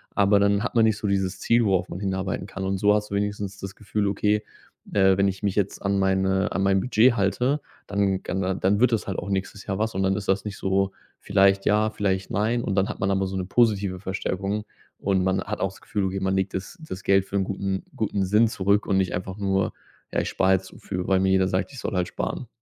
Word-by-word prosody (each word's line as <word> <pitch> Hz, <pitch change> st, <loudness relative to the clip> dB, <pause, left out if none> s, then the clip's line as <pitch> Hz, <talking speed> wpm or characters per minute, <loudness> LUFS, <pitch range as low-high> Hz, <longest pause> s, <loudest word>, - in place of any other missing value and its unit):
aber 100 Hz, 0 st, +4 dB
dann 100 Hz, +1 st, +2 dB
hat 125 Hz, -, -3 dB
man 115 Hz, -2 st, +4 dB
nicht 110 Hz, -2 st, +2 dB
so 105 Hz, -, -6 dB
dieses 95 Hz, -1 st, -1 dB
Ziel, 115 Hz, 0 st, +3 dB
worauf 95 Hz, -3 st, +1 dB
man 90 Hz, -, -6 dB
hinarbeiten 95 Hz, -1 st, -2 dB
kann. 95 Hz, -1 st, -6 dB
Und 95 Hz, 0 st, -1 dB
so 105 Hz, +1 st, +4 dB
hast 105 Hz, -1 st, -2 dB
du -, -, -1 dB
wenigstens 100 Hz, -1 st, -3 dB
das 95 Hz, 0 st, -7 dB
Gefühl: 105 Hz, -1 st, -2 dB
„Okay, 105 Hz, +1 st, +1 dB, 0.5 s
äh, 95 Hz, -1 st, +4 dB
wenn 100 Hz, -, +3 dB
ich 95 Hz, -1 st, -3 dB
mich 100 Hz, -2 st, -1 dB
jetzt 100 Hz, -2 st, -1 dB
an 100 Hz, 0 st, 0 dB
meine 95 Hz, 0 st, +1 dB
an 95 Hz, -, -1 dB
mein 95 Hz, 0 st, +3 dB
Budget 115 Hz, +2 st, +4 dB
halte, 125 Hz, +8 st, +1 dB, 0.3 s
dann 100 Hz, -2 st, 0 dB
kann 95 Hz, 0 st, -2 dB
dann 100 Hz, +2 st, +2 dB
wird 125 Hz, 0 st, +4 dB
das 110 Hz, -, -1 dB
halt 95 Hz, -, -3 dB
auch 95 Hz, -, -4 dB
nächstes 100 Hz, +1 st, -3 dB
Jahr 95 Hz, -1 st, -2 dB
was“ 110 Hz, +1 st, 0 dB
und 95 Hz, -, 0 dB
dann 95 Hz, 0 st, +2 dB
ist 100 Hz, -1 st, -5 dB
das 95 Hz, +2 st, +1 dB
nicht 100 Hz, -2 st, -5 dB
so 95 Hz, 0 st, +1 dB, 0.3 s
vielleicht 100 Hz, 0 st, +3 dB
ja, 105 Hz, +1 st, +3 dB
vielleicht 100 Hz, -2 st, -1 dB
nein. 115 Hz, +2 st, 0 dB
Und 95 Hz, -, -1 dB
dann 95 Hz, 0 st, +2 dB
hat -, -, -6 dB
man 95 Hz, 0 st, 0 dB
aber 95 Hz, 0 st, +1 dB
so 95 Hz, 0 st, -4 dB
'ne 95 Hz, -1 st, -2 dB
positive 100 Hz, -4 st, +1 dB
Verstärkung 95 Hz, +2 st, -3 dB, 0.4 s
und 95 Hz, -2 st, +1 dB
man 95 Hz, 0 st, +1 dB
hat 105 Hz, -, -4 dB
auch 95 Hz, -, 0 dB
das 95 Hz, -, -16 dB
Gefühl, 105 Hz, -5 st, -2 dB
okay, 95 Hz, +1 st, -2 dB
man 95 Hz, 0 st, 0 dB
legt 95 Hz, 0 st, -1 dB
das 95 Hz, -, -5 dB
das 95 Hz, -, -6 dB
Geld 95 Hz, -1 st, +3 dB
für 100 Hz, -, -7 dB
'n 95 Hz, -, +2 dB
guten 95 Hz, 0 st, -3 dB
guten 100 Hz, -3 st, -1 dB
Sinn 105 Hz, +4 st, +4 dB
zurück 100 Hz, 0 st, +1 dB
und 95 Hz, -2 st, +1 dB
nicht 95 Hz, -1 st, +1 dB
einfach 95 Hz, +2 st, -5 dB
nur, 95 Hz, -1 st, 0 dB, 0.4 s
ja, -, -, +2 dB
„ich -, -, -3 dB
spar 95 Hz, 0 st, +2 dB
jetzt 95 Hz, 0 st, 0 dB
so -, -, -14 dB
für, 90 Hz, -2 st, -4 dB
weil 95 Hz, -1 st, +3 dB
mir 95 Hz, 0 st, +2 dB
jeder 95 Hz, -1 st, +3 dB
sagt, 95 Hz, +8 st, -1 dB
ich 130 Hz, -, -8 dB
soll -, -, -3 dB
halt 90 Hz, -1 st, +1 dB
sparen“. 125 Hz, -, -4 dB
95 Hz, 255 wpm, -25 LUFS, 95-105 Hz, 0.5 s, aber